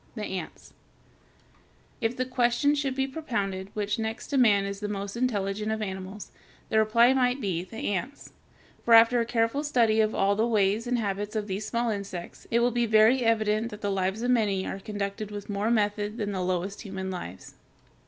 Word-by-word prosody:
THE 215 -3 -4
ANTS 185 -4 -7 1.3
If 225 +1 -1
the 255 - 0
question 250 +3 +2
should 280 -3 -1
be 265 0 +1
propounded 205 -10 -3
which 210 0 -1
next 220 +1 -4
to 285 - 0
man 205 -5 +4
is 200 0 -5
the 210 - -3
most 200 0 -4
intelligent 215 -3 -1
of 220 - -1
animals, 190 0 -6 0.4
the 220 - +3
reply 230 +4 +5
might 250 0 +2
be, 185 -7 -2
the 205 +2 -4
ants; 250 +10 -5 0.5
for 235 - +6
after 230 +2 +6
a 230 - 0
careful 235 +4 0
study 230 -7 +3
of 215 0 0
all 200 +1 +2
the 220 +3 +1
ways 215 +1 +1
and 245 0 +1
habits 205 0 -3
of 215 -1 -1
these 205 +1 -4
small 235 0 0
insects, 200 -4 -6
it 235 +1 +2
will 245 +1 +3
be 240 0 +1
very 220 +4 +5
evident 220 0 +1
that 210 -1 -10
the 205 - -1
lives 190 +3 -1
of 250 - +2
many 205 -6 +1
are 195 - -4
conducted 205 +1 -4
with 205 0 -7
more 205 +2 0
method 210 -1 0
than 205 -3 -2
the 190 -2 -2
lowest 185 +2 -2
human 190 -3 -5
lives. 95 - -8
215 Hz, 195 wpm, -27 LUFS, 200-235 Hz, 1.3 s, for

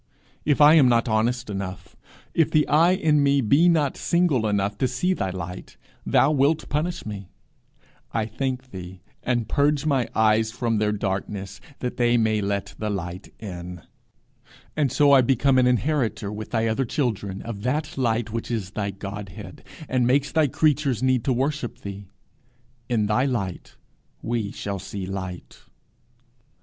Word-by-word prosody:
If 150 0 +2
I 150 +1 +9
am 145 -6 +6
not 115 0 +2
honest 120 +3 0
enough, 95 -2 -6 0.4
if 165 - +3
the 155 -1 +2
eye 165 +5 +4
in 155 -6 +2
me 140 0 +3
be 140 +9 +4
not 150 -5 +2
single 165 -10 +1
enough 100 -1 0
to 130 - +2
see 130 +10 0
thy 95 - -2
light, 90 0 -7 0.3
thou - - +4
wilt 150 +2 +2
punish 160 +4 -2
me, 100 -4 -7 0.8
I 110 -2 0
thank 130 +3 -4
thee, 90 -1 -9 0.2
and 120 -3 -1
purge 145 +2 +1
my 135 -6 +1
eyes 110 0 +3
from 115 -2 -1
their 105 0 +1
darkness, 100 -1 -4 0.2
that 125 - -3
they 120 0 +3
may 110 -2 +2
let 100 0 -2
the 110 - -2
light 90 -1 -5
in, 90 -4 -8 0.9
and 145 -5 +1
so 145 +1 +4
I 135 -2 +7
become 130 +1 +3
an 125 - +4
inheritor, 125 -5 0
with 105 +1 -6
thy 115 -1 0
other 115 +4 +1
children, 105 -7 -2
of 110 -3 -6
that 145 +7 -2
light 115 -3 0
which 115 0 -4
is 110 -6 -3
thy 105 -2 -2
Godhead, 100 -1 -8 0.2
and 125 -2 +1
makes 135 +2 +2
thy 160 -2 +3
creatures 140 -4 +1
need 130 -3 +2
to 135 - +2
worship 135 0 -1
thee. 100 0 -7 0.8
'In 115 -4 +1
thy 105 +6 +2
light 100 -9 -3 0.5
we 115 -3 -1
shall 100 -1 -4
see 95 +1 -6
light.' 95 -2 -6
115 Hz, 160 wpm, -24 LUFS, 100-140 Hz, 0.9 s, I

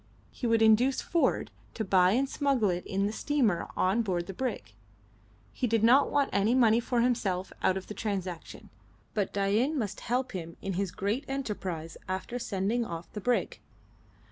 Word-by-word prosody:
He 245 - -3
would 230 -1 +3
induce 235 +5 +4
Ford 335 - 0 0.2
to 220 - -2
buy 185 -1 +4
and 265 +4 +2
smuggle 265 -8 +1
it 175 0 -3
in 195 +1 0
the 210 - -1
steamer 230 -9 0
on 190 +5 +2
board 180 -5 -1
the 195 - -7
brig. 225 - -4 0.8
He 250 - -1
did 225 -1 +1
not 255 +5 +6
want 285 -1 +1
any 205 +5 +3
money 230 -3 +5
for 240 0 0
himself 200 -7 0
out 190 - +2
of 190 - -6
the - - -7
transaction, 190 -6 -5 0.4
but 205 -3 -1
Dain 210 +10 +1
must 210 -5 -3
help 250 +1 -1
him 170 -3 -6
in 195 - -4
his 195 +1 -1
great 205 - -2
enterprise 195 -11 -4
after 190 +6 -3
sending 210 +2 -1
off 170 -5 -7
the 210 - -5
brig. 245 +3 0
215 Hz, 175 wpm, -29 LUFS, 190-245 Hz, 0.8 s, not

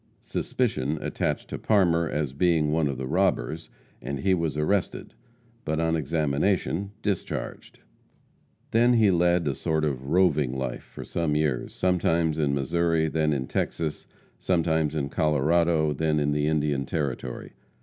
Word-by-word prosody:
Suspicion 70 +5 -1
attached - - -2
to - - -4
Parmer 85 -6 +2
as 75 -3 -2
being 80 -1 +2
one 80 -1 +2
of 70 -2 -3
the 65 - -4
robbers, 80 -2 0 0.3
and 65 +2 -4
he 95 - +2
was 80 -5 -1
arrested, 90 +6 -1 0.5
but, 80 +1 -1
on 80 0 +1
examination, 80 +6 0
discharged. 100 -4 -4 0.9
Then 120 +2 +4
he 110 -4 +4
led 85 -1 +2
a 70 - +1
sort 80 +3 -1
of 65 -3 -3
roving 75 -7 +2
life 65 0 -3
for - - -10
some 80 -3 -1
years, 75 -5 -1
sometimes 85 -3 +1
in 70 -2 +1
Missouri, 80 +3 +1
then 75 0 +1
in 65 -3 -1
Texas, 80 +3 -3 0.3
sometimes 80 -4 +1
in 70 -2 -1
Colorado, 80 +1 +2
then 75 +1 0
in 75 0 +1
the 75 +1 0
Indian 75 -3 0
Territory. 70 -5 -4
80 Hz, 145 wpm, -26 LUFS, 75-85 Hz, 0.9 s, Then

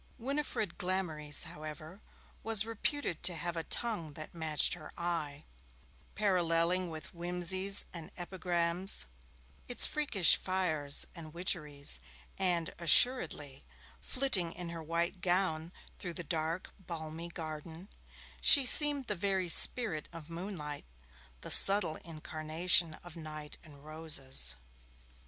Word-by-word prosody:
Winifred 260 - -4
Glamorys, 165 -5 -2
however, 155 +4 -10 0.4
was 220 -1 +1
reputed 230 - -4
to 180 - +4
have 170 +1 -4
a 165 - -3
tongue 175 -11 -1
that 155 +1 -10
matched 160 -3 +1
her - - -10
eye; 160 -4 -5 0.7
paralleling 180 -2 0
with 155 -1 -9
whimsies 180 +3 +2
and 165 -3 -9
epigrams 175 - -1 0.6
its 245 - +4
freakish 260 - +2
fires 160 -7 0
and 165 -2 -12
witcheries, 150 - +2 0.4
and, 175 -3 -1
assuredly, 165 - +2 0.4
flitting 215 -11 +1
in 175 -1 -8
her 170 -1 -8
white 170 +3 -3
gown 175 -3 -1 0.3
through 175 -3 -7
the 175 - -6
dark 160 +2 -4
balmy 165 -2 -8
garden, 160 +1 -9 0.5
she 280 -3 +6
seemed 290 +1 +7
the 210 - -2
very 190 -1 -2
spirit 190 - +3
of 165 -1 -11
moonlight, 165 - -8 0.6
the - - -4
subtle 195 -5 +8
incarnation 160 +1 0
of 175 -2 -13
night 155 -2 -10
and 145 -2 -17
roses. 145 - 0
170 Hz, 115 wpm, -31 LUFS, 155-190 Hz, 0.7 s, subtle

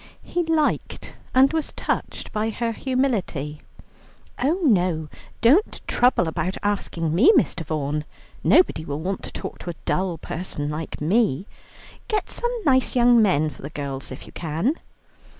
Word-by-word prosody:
He 350 - -1
liked 320 -2 -1 0.2
and 265 +3 +5
was 320 -2 -1
touched - - -3
by 215 +1 -1
her 230 +1 -2
humility. 220 - -1 0.8
"Oh 305 +8 +2
no, 180 - +2 0.3
don't 290 - +4
trouble 245 -8 +3
about 180 +3 -2
asking 175 -6 -1
me, 245 - +7
Mr. 180 - +1
Vaughan, 150 -1 -2 0.4
nobody 355 - +4
will 145 -2 -4
want 190 +3 -2
to - - -8
talk - - -7
to - - -7
a 170 - -4
dull 185 -2 0
person 150 -4 -4
like 155 0 -5
me. 190 - +2 0.6
Get 420 -4 -1
some 480 0 -1
nice 260 -3 +3
young 240 -1 +6
men 155 -7 +3
for - - -14
the 140 - -6
girls, 140 -3 -5
if 130 - -8
you - - -13
can." 165 - -1
190 Hz, 150 wpm, -23 LUFS, 155-255 Hz, 0.8 s, me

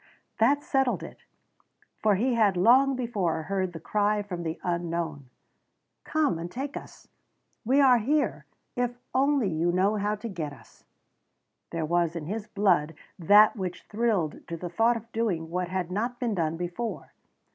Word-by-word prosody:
That 280 +6 +3
settled 270 -4 +1
it, - - -11 0.7
for 210 -2 +3
he 245 +6 +1
had 210 -5 +3
long 260 +8 +5
before 200 -10 -1
heard 190 +1 -1
the 165 - -8
cry 210 +4 0
from 180 -4 -5
the 160 -1 -4
unknown: 170 -5 -3 0.8
"Come 300 - +1
out - - -5
and 175 +1 -6
take 275 +5 -5
us! - - -10 0.6
We 265 +5 +3
are 255 -3 +6
here 290 +7 0 0.3
if 245 -1 -1 0.2
only 275 -3 +2
you 170 0 0
know 195 +4 +2
how 210 +1 0
to 215 +3 -7
get 165 -8 -5
us." 125 - -19 0.8
There 165 -2 -2
was 170 +1 +1
in 165 -3 -4
his 210 +5 -4
blood 175 -7 +1 0.2
that 205 +5 +6
which 185 -4 -5
thrilled 210 -8 -1
to 170 - -5
the 175 +1 -6
thought 230 +7 +2
of 230 +1 -12
doing 185 -9 -1
what 180 0 -1
had 180 -1 -3
not 235 +6 -2
been 240 -3 -1
done 165 -3 -1
before. 180 +7 -5
200 Hz, 170 wpm, -27 LUFS, 170-235 Hz, 0.8 s, are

